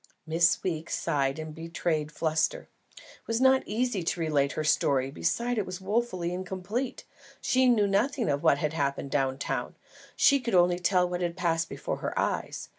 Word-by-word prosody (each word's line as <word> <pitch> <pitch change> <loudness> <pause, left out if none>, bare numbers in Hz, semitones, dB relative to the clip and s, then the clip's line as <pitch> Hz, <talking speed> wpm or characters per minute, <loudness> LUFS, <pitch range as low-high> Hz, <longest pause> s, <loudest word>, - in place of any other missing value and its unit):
Miss 165 +1 +2
Weeks 165 -3 -2
sighed 140 -4 0
and 155 -1 -6
betrayed 165 -1 -2
fluster. 155 0 -1 0.3
It - - -18
was 230 0 0
not 265 0 +5
easy 225 -2 -1
to 170 +1 -2
relate 145 -3 +1
her 155 - -2
story; 135 -3 +2
besides 235 - -1
it 205 - -1
was 185 0 -5
wofully 190 -3 -1
incomplete. 185 +7 -4 0.4
She 255 0 +3
knew 220 -4 +4
nothing 230 +6 +1
of 140 0 0
what 140 - +4
had 150 +1 -2
happened 140 -2 -2
down 135 -2 0
town, - - -3 0.4
she 280 - +5
could 235 -5 -1
only 175 0 +4
tell 180 0 +2
what 175 0 -3
had 175 0 -2
passed 165 -2 0
before - - -4
her - - -4
eyes. - - -2
175 Hz, 180 wpm, -28 LUFS, 155-210 Hz, 0.4 s, not